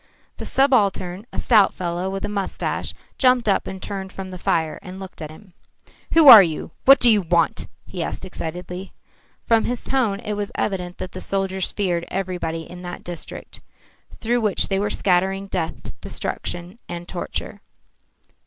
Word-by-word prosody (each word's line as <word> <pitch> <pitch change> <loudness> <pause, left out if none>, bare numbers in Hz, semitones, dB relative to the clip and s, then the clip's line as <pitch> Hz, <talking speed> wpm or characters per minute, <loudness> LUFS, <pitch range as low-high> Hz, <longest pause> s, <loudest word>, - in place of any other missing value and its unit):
The - - -6
subaltern, 205 -7 +1
a - - -9
stout 215 -5 +4
fellow 175 +1 -2
with 195 +1 -3
a - - -2
moustache, 200 -2 -3 0.2
jumped 250 -3 +4
up, 200 - +2
turned 190 -1 -5
from 190 -1 -7
the 185 - -8
fire, 160 -2 0
and 185 +1 -9
looked 190 -3 -10
at 155 - -5
him. 180 +4 -15 0.6
"Who 325 -3 +7
are 230 -6 +13
you? 165 -4 -2
What 275 +1 +8
do 245 - +5
you 215 -3 +6
want?" 170 -2 +1 0.2
he 180 - -6
asked 165 - -4
excitedly. 180 +1 -6 0.5
From 225 -1 +3
his 245 0 0
tone 230 -7 0
it 210 -3 -3
was 205 -1 -3
evident 180 -3 -2
that 185 - -6
the 185 - -8
soldiers 190 -1 0
feared 175 -4 -1
everybody 175 -4 -3
in 180 0 -10
that 175 -1 -7
district, 175 -2 -8 0.6
through 240 +1 0
which 210 -3 +1
they 195 -1 +1
went 205 +1 -1
scattering 190 +1 +1
death, 165 -4 -4
destruction 175 +5 -5
and 175 0 -6
torture. 180 - -5
190 Hz, 165 wpm, -22 LUFS, 175-205 Hz, 0.6 s, are